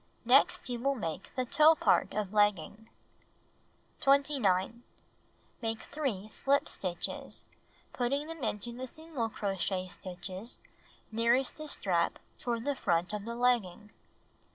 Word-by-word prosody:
Next 260 +4 +4
you 245 -1 -2
will 275 +3 +1
make 165 -10 -4
the 255 -1 0
toe 310 +6 +6
part - - +2
of 210 -2 -2
legging. 210 +1 +1 1.1
21. 240 -7 +2 0.8
Make 225 -1 -2
3 260 -10 -3
slip 275 +6 +1
stitches, 180 -2 -3 0.5
putting 275 +4 0
them 325 -3 -7
into 210 +2 -2
the 260 +1 -5
single 305 -5 -4
crochet 195 -3 -1
stitches 185 +4 -5 0.5
nearest 235 +4 +2
the 310 0 -7
strap 175 - 0 0.2
toward 235 -1 -2
the 285 - +1
front 175 -6 0
of 210 -1 -4
the 235 0 -4
legging. 230 -5 +1
230 Hz, 125 wpm, -31 LUFS, 195-270 Hz, 1.1 s, toe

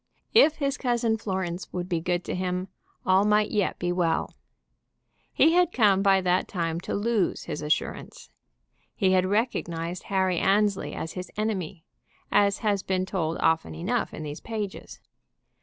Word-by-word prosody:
If 380 -9 +6
his 280 -1 -2
cousin 235 -3 +1
Florence 190 -4 -4
would 180 -1 -4
be 175 -3 0
good 175 +1 -1
to - - -4
him 180 +1 -2 0.4
all 190 +1 +4
might 210 0 +2
yet 205 -3 0
be 175 0 -1
well. 175 -2 0 1.0
He 320 - +4
had 355 -1 +4
come 205 - +4
by 195 -1 +4
that 180 0 +1
time 165 -3 -2
to - - -4
lose 215 -1 0
his 155 -3 -5
assurance. 150 0 -3 0.6
He 190 - +2
had 185 0 +3
recognized 180 -5 -2
Harry 190 -3 +1
Annesley 205 0 +1
as 160 - -4
his 180 -1 -6
enemy, 195 -5 -3 0.5
as 200 -1 +3
has 200 -2 +2
been 185 -1 -1
told 170 -4 -2
often 160 - +1
enough 80 - -1
in 155 - -7
these 150 0 -6
pages. 215 -4 -6
190 Hz, 155 wpm, -26 LUFS, 175-210 Hz, 1.0 s, If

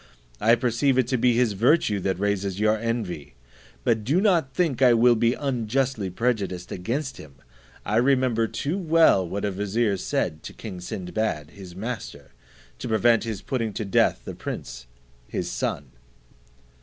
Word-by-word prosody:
I 115 +2 +5
perceive 125 +2 +1
it 130 - +4
to 130 - +1
be 125 +1 +4
his 120 -2 +2
virtue 110 - +2
that 95 -1 -1
raises 100 -1 -1
your 110 0 +3
envy; 110 - -4 0.5
but 110 -3 +1
do 145 - +2
not 175 -10 +2
think 155 -8 0
I 125 -2 +6
will 120 +1 +5
be 120 +2 +2
unjustly 125 -4 -1
prejudiced 100 -4 -2
against 125 +10 -3
him. 75 -3 -12 0.5
I 105 +2 0
remember 125 -3 +2
too 150 - -3
well 160 - +4
what 100 +3 -3
a 100 - 0
vizier 105 +2 0
said 80 -3 -2
to - - -9
king 95 -5 -8
Sinbad, 90 -5 -3
his 95 -3 -11
master, 95 - -6 0.5
to - - -5
prevent 115 +1 +3
his 110 -3 -5
putting 115 -5 -2
to 110 - -3
death 95 - +2
the - - -5
prince - - -7 0.4
his - - -3
son." 70 -3 -3
110 Hz, 160 wpm, -25 LUFS, 95-125 Hz, 0.5 s, I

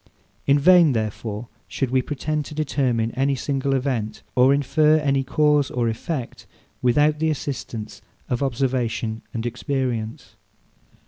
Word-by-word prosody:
In 140 +1 +5
vain, 170 -1 +6
therefore, 110 0 -3 0.2
should 135 -3 -2
we 130 0 +3
pretend 150 +3 -2
to 150 - -9
determine 130 -6 0
any 135 +2 +1
single 135 +1 -1
event, 125 -5 -2
or 130 +2 +5
infer 150 +2 +3
any 140 -3 +1
cause 150 +1 +2
or 120 -1 -1
effect, 120 +3 -4 0.3
without 150 +5 +3
the 160 0 +1
assistance 125 -7 -5 0.3
of 125 - -2
observation 120 -4 -1
and 115 0 -4
experience. 120 -3 -3
135 Hz, 130 wpm, -23 LUFS, 120-145 Hz, 0.3 s, vain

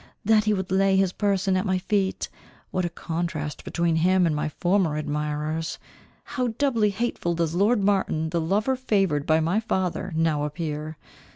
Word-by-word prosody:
That 215 0 +4
he 215 - +3
would 190 -1 -4
lay 195 0 +3
his 190 -2 +2
person 195 -2 +1
at 185 - +1
my 190 -3 +1
feet! 190 +1 -1 0.4
What 185 -1 0
a - - -1
contrast 165 -3 -4
between 170 -1 0
him 180 +2 +3
and 160 -2 +1
my 150 +1 -1
former 175 -1 +1
admirers! 150 +2 -2 0.5
How 250 -1 -2
doubly 235 -7 +2
hateful 200 -5 -2
does 165 -1 0
lord 205 +4 +2
Martin, 190 -5 +1
the 170 -1 0
lover 210 +10 +1
favoured 195 - 0
by 160 0 +4
my 170 +7 +1
father 190 -3 -2
now 160 -2 +1
appear! 155 0 -4
180 Hz, 170 wpm, -25 LUFS, 160-200 Hz, 0.5 s, That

